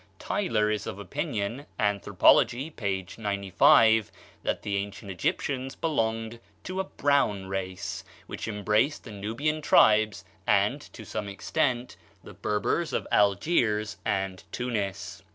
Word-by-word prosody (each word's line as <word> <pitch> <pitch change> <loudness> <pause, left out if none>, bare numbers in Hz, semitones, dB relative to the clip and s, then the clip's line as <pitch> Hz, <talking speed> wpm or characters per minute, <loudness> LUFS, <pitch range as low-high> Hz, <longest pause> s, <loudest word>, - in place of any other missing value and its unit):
Tylor 110 - 0
is 105 -2 -2
of - - -5
opinion 100 - -3
("Anthropology," 110 - +3
p. 100 -8 -2
95) 105 +2 +4 0.3
that - - -2
the 100 - -2
ancient 100 0 -5
Egyptians 130 +8 -2
belonged 115 -6 -1 0.2
to 185 +1 -4
a 190 - 0
brown 140 - +1
race, 95 0 -4 0.2
which - - -6
embraced 105 +6 +1
the 115 - -10
Nubian 115 +10 -2
tribes 110 -6 +4 0.2
and, - - +3
to - - -10
some 105 - -4
extent, 120 +5 -1 0.3
the - - -11
Berbers 105 +11 -1
of - - -1
Algiers 105 - +2
and 95 -1 -2
Tunis. 110 -6 -3
105 Hz, 120 wpm, -27 LUFS, 100-125 Hz, 0.3 s, 95